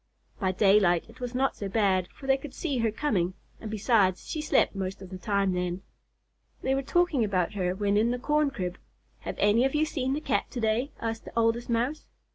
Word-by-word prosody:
By 190 Hz, -3 st, +1 dB
daylight 195 Hz, -3 st, +4 dB
it 230 Hz, -, -16 dB
was 245 Hz, 0 st, -5 dB
not 265 Hz, +1 st, +1 dB
so 200 Hz, -, -5 dB
bad, 195 Hz, -3 st, +2 dB
for 270 Hz, -, -14 dB
they 270 Hz, 0 st, +4 dB
could 270 Hz, 0 st, -8 dB
see 285 Hz, -7 st, -2 dB
her 230 Hz, -1 st, +2 dB
coming, 200 Hz, -, 0 dB, 0.2 s
and 220 Hz, -, -7 dB
besides, 210 Hz, -3 st, +2 dB
she 310 Hz, -, -3 dB
slept 300 Hz, -, +2 dB
much 195 Hz, 0 st, -4 dB
of 190 Hz, -1 st, -11 dB
the 185 Hz, -, -7 dB
time 200 Hz, 0 st, +1 dB
then. 180 Hz, +1 st, -2 dB, 0.8 s
They 265 Hz, -, +1 dB
were 270 Hz, -, +1 dB
talking 310 Hz, -2 st, +2 dB
about 190 Hz, -3 st, 0 dB
her 185 Hz, -2 st, -1 dB
when 205 Hz, +1 st, +1 dB
in 220 Hz, +3 st, +3 dB
the 245 Hz, -, 0 dB
corn 300 Hz, +3 st, +1 dB
crib. 180 Hz, -9 st, -4 dB, 0.4 s
"Have -, -, -5 dB
any 210 Hz, +4 st, +4 dB
of 270 Hz, +2 st, +1 dB
you 305 Hz, +1 st, +3 dB
seen 265 Hz, -4 st, -1 dB
the 290 Hz, -, -1 dB
Cat 310 Hz, -, -1 dB
to 250 Hz, -, -5 dB
day?" 225 Hz, +5 st, 0 dB
asked 225 Hz, -1 st, -4 dB
the -, -, -10 dB
Oldest 230 Hz, +1 st, +1 dB
Mouse. 245 Hz, +6 st, -1 dB
225 Hz, 220 wpm, -28 LUFS, 195-265 Hz, 0.8 s, daylight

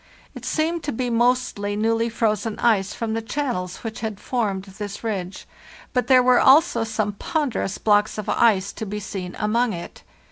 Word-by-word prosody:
It -, -, -9 dB
seemed 325 Hz, +2 st, 0 dB
to 290 Hz, -, -1 dB
be 245 Hz, +1 st, -2 dB
mostly 235 Hz, -4 st, +1 dB
newly 225 Hz, +2 st, +1 dB
frozen 220 Hz, -1 st, -1 dB
ice 210 Hz, -4 st, +2 dB
from 225 Hz, -2 st, -3 dB
the 225 Hz, -, -1 dB
chan 275 Hz, +3 st, -2 dB
nels 180 Hz, 0 st, -5 dB
which 225 Hz, -1 st, -5 dB
had 220 Hz, -3 st, -4 dB
formed 205 Hz, -7 st, -2 dB
this 200 Hz, +2 st, -8 dB
ridge; 195 Hz, -5 st, -4 dB, 0.5 s
but 250 Hz, -2 st, 0 dB
there 255 Hz, -2 st, +6 dB
were 250 Hz, -1 st, +5 dB
also 270 Hz, -4 st, +5 dB
some 215 Hz, -2 st, -1 dB
ponderous 260 Hz, -, -2 dB
blocks 210 Hz, 0 st, +2 dB
of 215 Hz, -1 st, -5 dB
ice 200 Hz, -4 st, +2 dB
to 220 Hz, -, -6 dB
be 210 Hz, +2 st, -4 dB
seen 185 Hz, -3 st, -6 dB
among 225 Hz, +2 st, +1 dB
it. 170 Hz, -, -8 dB
220 Hz, 180 wpm, -23 LUFS, 205-245 Hz, 0.5 s, there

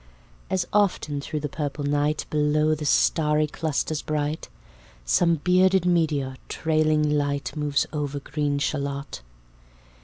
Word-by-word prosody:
As 185 Hz, -2 st, 0 dB
often 180 Hz, -8 st, +1 dB
thro' 150 Hz, +2 st, -4 dB
the 150 Hz, -, -3 dB
purple 145 Hz, 0 st, -4 dB
night, 145 Hz, +1 st, 0 dB
Below 150 Hz, +1 st, +2 dB
the 150 Hz, 0 st, -4 dB
starry 150 Hz, +3 st, +3 dB
clusters 155 Hz, 0 st, -2 dB
bright, 150 Hz, 0 st, -3 dB, 0.6 s
Some 170 Hz, -, +3 dB
bearded 185 Hz, +3 st, +3 dB
meteor, 150 Hz, -7 st, +1 dB
trailing 155 Hz, -1 st, +1 dB
light, 145 Hz, -1 st, -1 dB
Moves 150 Hz, -2 st, +1 dB
over 145 Hz, -1 st, -2 dB
green 145 Hz, 0 st, -2 dB
Shalott. 140 Hz, -, -3 dB
150 Hz, 120 wpm, -25 LUFS, 145-155 Hz, 0.6 s, starry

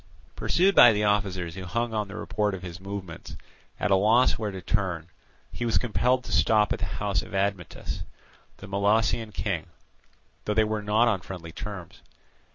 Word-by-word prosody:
Pursued 190 Hz, +3 st, +2 dB
by 120 Hz, -, +9 dB
the 105 Hz, 0 st, 0 dB
officers 95 Hz, -5 st, 0 dB
who 95 Hz, +1 st, -7 dB
hung 115 Hz, +5 st, -2 dB
on 105 Hz, -2 st, -1 dB
the 100 Hz, -, -9 dB
report 105 Hz, -2 st, -1 dB
of 90 Hz, -, -10 dB
his 90 Hz, -1 st, -7 dB
movements, 95 Hz, -3 st, -7 dB, 0.4 s
at 105 Hz, -, 0 dB
a -, -, +7 dB
loss 110 Hz, +6 st, +4 dB
where 110 Hz, -2 st, -3 dB
to 95 Hz, -1 st, -6 dB
turn, 90 Hz, -4 st, -2 dB, 0.4 s
he -, -, -5 dB
was 115 Hz, -2 st, +2 dB
compelled 125 Hz, +2 st, +1 dB
to -, -, -8 dB
stop 110 Hz, -2 st, +3 dB
at -, -, -5 dB
the -, -, -1 dB
house 100 Hz, -4 st, 0 dB
of -, -, -9 dB
Admetus, 95 Hz, -3 st, -2 dB, 0.6 s
the 100 Hz, -, -10 dB
Molossian 105 Hz, +3 st, +1 dB
king, -, -, -3 dB, 0.8 s
though 105 Hz, -, -1 dB
they 110 Hz, -, +5 dB
were 110 Hz, 0 st, -2 dB
not 105 Hz, +3 st, +3 dB
on 105 Hz, -6 st, +1 dB
friendly 85 Hz, -3 st, -8 dB
terms. 95 Hz, -1 st, -8 dB
105 Hz, 180 wpm, -26 LUFS, 95-110 Hz, 0.8 s, by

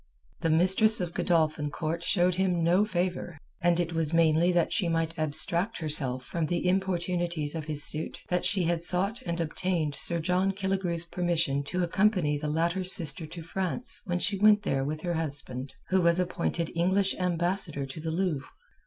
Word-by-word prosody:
The 165 Hz, -, 0 dB
mistress 190 Hz, +7 st, +4 dB
of 175 Hz, -2 st, -4 dB
Godolphin 155 Hz, -4 st, 0 dB
Court 160 Hz, +3 st, -4 dB
showed 180 Hz, -1 st, +2 dB
him 180 Hz, -2 st, 0 dB
no 175 Hz, +4 st, +3 dB
favour 180 Hz, -4 st, -3 dB, 0.2 s
and 175 Hz, 0 st, +2 dB
it 170 Hz, -1 st, -2 dB
was 165 Hz, -1 st, -1 dB
mainly 165 Hz, +1 st, +3 dB
that 175 Hz, -2 st, 0 dB
she 185 Hz, -6 st, 0 dB
might 165 Hz, 0 st, -1 dB
abstract 170 Hz, +7 st, +2 dB
herself 135 Hz, -5 st, -2 dB
from 165 Hz, +2 st, -3 dB
the 175 Hz, +2 st, -2 dB
importunities 175 Hz, -4 st, -1 dB
of 160 Hz, -2 st, -5 dB
his 150 Hz, -2 st, +2 dB
suit 155 Hz, +1 st, +2 dB
that 180 Hz, 0 st, 0 dB
she 180 Hz, +1 st, +1 dB
had 170 Hz, 0 st, -1 dB
sought 195 Hz, +7 st, +2 dB
and 170 Hz, 0 st, -3 dB
obtained 165 Hz, -1 st, -2 dB
Sir 170 Hz, +3 st, +1 dB
John 180 Hz, +4 st, 0 dB
Killigrew's 190 Hz, -3 st, -2 dB
permission 170 Hz, -5 st, -1 dB
to 180 Hz, +5 st, -2 dB
accompany 180 Hz, -4 st, +1 dB
the 150 Hz, +1 st, -4 dB
latter's 170 Hz, +4 st, +2 dB
sister 160 Hz, -3 st, +5 dB
to 165 Hz, +1 st, -9 dB
France 190 Hz, +7 st, -2 dB
when 175 Hz, -2 st, -2 dB
she 195 Hz, +2 st, -1 dB
went 210 Hz, 0 st, +4 dB
there 135 Hz, -1 st, -1 dB
with 155 Hz, +2 st, -4 dB
her 175 Hz, 0 st, -3 dB
husband, 140 Hz, -5 st, -4 dB
who 190 Hz, 0 st, +2 dB
was 170 Hz, 0 st, +4 dB
appointed 170 Hz, -2 st, -2 dB
English 190 Hz, +3 st, +1 dB
ambassador 175 Hz, -4 st, -1 dB
to 135 Hz, +4 st, -9 dB
the 160 Hz, +1 st, -4 dB
Louvre. 160 Hz, -5 st, -2 dB
170 Hz, 180 wpm, -27 LUFS, 160-185 Hz, 0.2 s, sister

